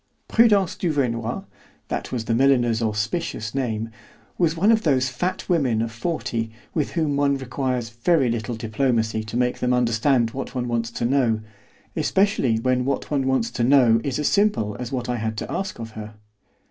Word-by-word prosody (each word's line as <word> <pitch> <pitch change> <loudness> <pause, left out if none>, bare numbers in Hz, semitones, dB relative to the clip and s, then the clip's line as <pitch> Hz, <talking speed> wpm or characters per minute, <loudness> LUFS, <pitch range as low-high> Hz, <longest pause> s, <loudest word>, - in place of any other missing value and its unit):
Prudence 205 -6 +4
Duvernoy 125 -9 -1 0.5
(that - - -3
was 120 -3 -3
the 115 - 0
milliner's 120 -2 +3
auspicious 110 +2 -2
name) 115 -4 -2 0.4
was 165 -2 +1
one 200 +7 +4
of 220 -1 +3
those 130 -7 +2
fat 180 +9 -3
women 140 - +2
of 115 0 -1
forty 115 -2 -2 0.2
with 155 -4 -1
whom 155 -4 0
one 140 -1 +2
requires 130 -2 -2
very 130 +4 +2
little 115 0 -2
diplomacy 110 -1 0
to 110 +2 -5
make 125 0 0
them 125 0 +1
understand 120 0 +2
what 135 +1 -6
one 125 -1 -1
wants 115 -1 -1
to 120 - -3
know, 120 -4 +2 0.5
especially 170 - +2
when 125 +2 +1
what 140 +3 -2
one 135 -2 +1
wants 130 -3 +1
to 120 - -1
know 120 -3 +5
is 135 -3 -2
as 150 - 0
simple 200 - +2
as 125 -1 -5
what 130 -2 -3
I 125 -1 -1
had 110 -1 -3
to - - -5
ask 195 -1 -3
of 115 -1 -7
her. 110 0 -9
125 Hz, 180 wpm, -23 LUFS, 115-140 Hz, 0.5 s, know